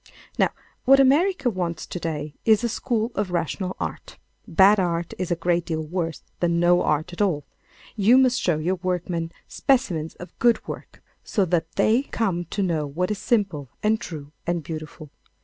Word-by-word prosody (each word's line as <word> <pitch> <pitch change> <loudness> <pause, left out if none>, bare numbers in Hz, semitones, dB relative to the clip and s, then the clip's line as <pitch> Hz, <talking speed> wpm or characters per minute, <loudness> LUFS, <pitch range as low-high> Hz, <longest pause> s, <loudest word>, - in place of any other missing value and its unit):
Now, - - +4 0.4
what 270 +1 +7
America 290 +3 +4
wants 175 -7 -2
to 180 - -6
day 150 -3 -4
is 220 0 +4
a 235 - +1
school 230 0 -1
of 205 -2 -1
rational 180 +2 -2
art. - - -6 0.3
Bad 200 +1 +6
art 170 -2 -1
is 185 - -2
a 175 - +2
great 170 +1 +1
deal 160 -1 -3
worse 165 0 -3 0.2
than 170 -1 +1
no 175 +1 +4
art 155 +4 0
at 175 - -4
all. 165 -8 +1 0.5
You 225 +4 +5
must 260 -1 +4
show 175 -4 +2
your 175 +5 -1
workmen 175 -2 -2 0.2
specimens 180 - 0
of 180 - -12
good 235 -2 +3
work - - -8 0.2
so 200 - +1
that 165 -2 -1
they 220 +5 +3
come 195 -10 -2
to 200 +5 -2
know 160 -5 0
what 180 +7 -2
is 210 - -2
simple 190 - 0
and 215 +1 +2
true 150 -4 -7 0.2
and 170 -2 0
beautiful. 155 -1 -8
180 Hz, 180 wpm, -24 LUFS, 165-215 Hz, 0.5 s, what